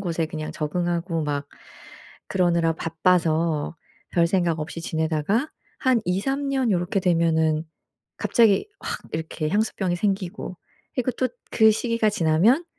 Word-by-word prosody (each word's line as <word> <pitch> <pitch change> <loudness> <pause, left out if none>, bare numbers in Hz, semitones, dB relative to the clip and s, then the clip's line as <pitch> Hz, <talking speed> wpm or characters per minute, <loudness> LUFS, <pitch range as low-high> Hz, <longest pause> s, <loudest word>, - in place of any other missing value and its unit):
곳에 170 -4 -1
그냥 155 -1 -5
적응하고 170 +1 -1
막 145 -1 -2 0.8
그러느라 170 -3 +2
바빠서 165 -1 +1 0.3
별생각 170 -1 +2
없이 160 +2 -5
지내다가 160 - 0 0.3
한 255 -4 +3
2-3 270 +11 0
년 265 -4 +1
요렇게 180 +3 0
되면은 160 -3 +2 0.5
갑자기 230 - +3
확 - - -3
이렇게 160 -1 -3
향수병이 200 -3 0
생기고 190 -2 -2 0.4
그리고 255 0 0
또 255 +2 0 0.2
그 220 -1 +6
시기가 230 0 +1
지나면 200 - +3
175 Hz, 270 characters per minute, -24 LUFS, 160-215 Hz, 0.8 s, 그